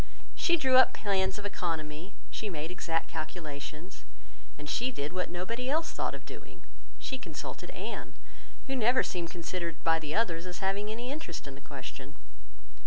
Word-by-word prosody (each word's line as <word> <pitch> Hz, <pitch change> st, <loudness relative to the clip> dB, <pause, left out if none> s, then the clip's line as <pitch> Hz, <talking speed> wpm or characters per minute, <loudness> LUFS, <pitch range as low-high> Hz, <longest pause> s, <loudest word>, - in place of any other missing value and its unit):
She 345 Hz, -1 st, +4 dB
drew 260 Hz, -4 st, +6 dB
up 260 Hz, -, +9 dB
plans 195 Hz, -2 st, +2 dB
of 205 Hz, -, -5 dB
economy, 165 Hz, -2 st, -2 dB, 0.2 s
she 215 Hz, -, -2 dB
made 160 Hz, -2 st, -2 dB
exact 165 Hz, -2 st, 0 dB
calculations, 155 Hz, 0 st, -5 dB, 0.5 s
and 150 Hz, +1 st, -7 dB
she 245 Hz, +10 st, +2 dB
did 145 Hz, -, -2 dB
what 180 Hz, 0 st, 0 dB
nobody 230 Hz, +9 st, -1 dB
else 320 Hz, +3 st, +3 dB
thought -, -, 0 dB
of -, -, -9 dB
doing: -, -, -10 dB, 0.3 s
she 265 Hz, -, -3 dB
consulted -, -, -5 dB
Anne, -, -, -4 dB, 0.5 s
who 270 Hz, -, 0 dB
never 245 Hz, +1 st, +6 dB
seemed 175 Hz, -2 st, -1 dB
considered 170 Hz, 0 st, -2 dB
by 165 Hz, 0 st, +5 dB
the 155 Hz, -1 st, -2 dB
others 180 Hz, -6 st, +2 dB
as 180 Hz, -, -4 dB
having 195 Hz, +2 st, +1 dB
any 240 Hz, +4 st, -2 dB
interest 310 Hz, +3 st, -4 dB
in 140 Hz, -, -6 dB
the 135 Hz, -, -10 dB
question. 140 Hz, 0 st, -7 dB
180 Hz, 170 wpm, -32 LUFS, 160-230 Hz, 0.5 s, up